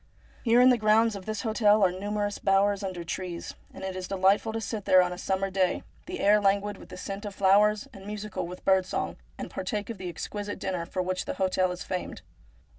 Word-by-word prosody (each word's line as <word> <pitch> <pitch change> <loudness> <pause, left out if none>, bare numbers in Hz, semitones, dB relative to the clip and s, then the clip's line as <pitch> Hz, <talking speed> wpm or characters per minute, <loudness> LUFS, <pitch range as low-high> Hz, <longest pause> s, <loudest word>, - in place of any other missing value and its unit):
Here 235 0 +5
in 255 +1 +7
the 245 - +2
grounds 215 +1 +4
of 195 0 -9
this 215 +2 -3
hotel 215 -2 +4
are 185 - +4
numerous 205 +2 -3
bowers 200 +1 +2
under 185 -3 -4
the - - -8
trees, 175 0 -5 0.2
and - - -10
it 190 -1 -4
is 185 0 -5
delightful 195 +3 +2
to 225 - -3
sit 220 -1 -4
there 185 -1 +6
on 180 0 -2
a - - -8
summer 195 0 -1
day, 185 -1 +1 0.2
the 365 +1 -5
air 210 +1 +5
languid 200 0 +1
with - - -13
the - - -9
scent 195 +2 -6
of 205 -2 -6
flowers 205 +2 +4
and 195 0 -11
musical 210 -3 -4
with 180 +1 -10
bird 190 -1 +4
song, - - -3 0.2
and - - -6
partake 205 +3 -3
of 215 - -9
the 185 -1 -4
exquisite 205 +4 -5
dinner 180 -3 -3
for 185 - -2
which 185 0 -2
the - - -4
hotel 185 -1 +1
is 180 0 -6
famed. 180 -1 -5
195 Hz, 230 wpm, -28 LUFS, 185-210 Hz, 0.2 s, in